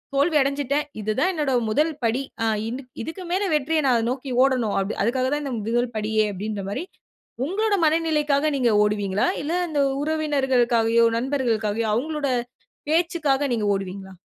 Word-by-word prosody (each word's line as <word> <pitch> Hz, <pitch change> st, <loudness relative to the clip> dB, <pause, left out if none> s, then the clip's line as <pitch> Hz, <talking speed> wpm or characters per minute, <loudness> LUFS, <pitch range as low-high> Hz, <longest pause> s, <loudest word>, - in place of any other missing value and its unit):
தோல்வி 300 Hz, +3 st, +3 dB
அடஞ்சுட்டேன். 280 Hz, +1 st, 0 dB, 0.2 s
இது 215 Hz, +1 st, -1 dB
தான் 370 Hz, +6 st, +3 dB
என்னோட 295 Hz, -4 st, -1 dB, 0.2 s
1 305 Hz, +8 st, +2 dB
படி, 230 Hz, +4 st, +1 dB, 0.2 s
ஆ -, -, +2 dB, 0.2 s
இது 255 Hz, +3 st, -5 dB, 0.2 s
இதுக்கு 360 Hz, +6 st, -7 dB
மேல 385 Hz, +3 st, +1 dB
வெற்றிய 305 Hz, +2 st, +1 dB
நா -, -, +4 dB, 0.2 s
நோக்கி 260 Hz, +1 st, -4 dB
ஓடணும். 250 Hz, -6 st, +1 dB, 0.3 s
அதுக்காக 255 Hz, +3 st, +1 dB
தா 295 Hz, -, 0 dB
இந்த 270 Hz, -3 st, -4 dB
1 235 Hz, +3 st, -1 dB
படியே!" 215 Hz, 0 st, +1 dB
அப்டின்ற 205 Hz, +1 st, -4 dB
மாரி 280 Hz, -, -3 dB, 0.6 s
உங்களுடைய 405 Hz, +3 st, 0 dB
மனநிலைக்காக 305 Hz, -2 st, +2 dB
நீங்க 240 Hz, -3 st, +2 dB
ஓடுவீங்களா? 205 Hz, -, 0 dB, 0.2 s
இல்ல 320 Hz, +4 st, -2 dB, 0.2 s
இந்த 290 Hz, -2 st, +1 dB, 0.2 s
உறவினர்களுக்காகயோ 255 Hz, -7 st, +2 dB
நண்பர்களுக்காகயோ 230 Hz, -5 st, -1 dB
அவங்களுடைய 285 Hz, 0 st, -1 dB, 0.5 s
பேச்சுக்காக 310 Hz, -4 st, +1 dB
நீங்க 215 Hz, -3 st, -1 dB
ஓடுவீங்களா? 195 Hz, 0 st, -5 dB
265 Hz, 145 wpm, -23 LUFS, 225-300 Hz, 0.6 s, நா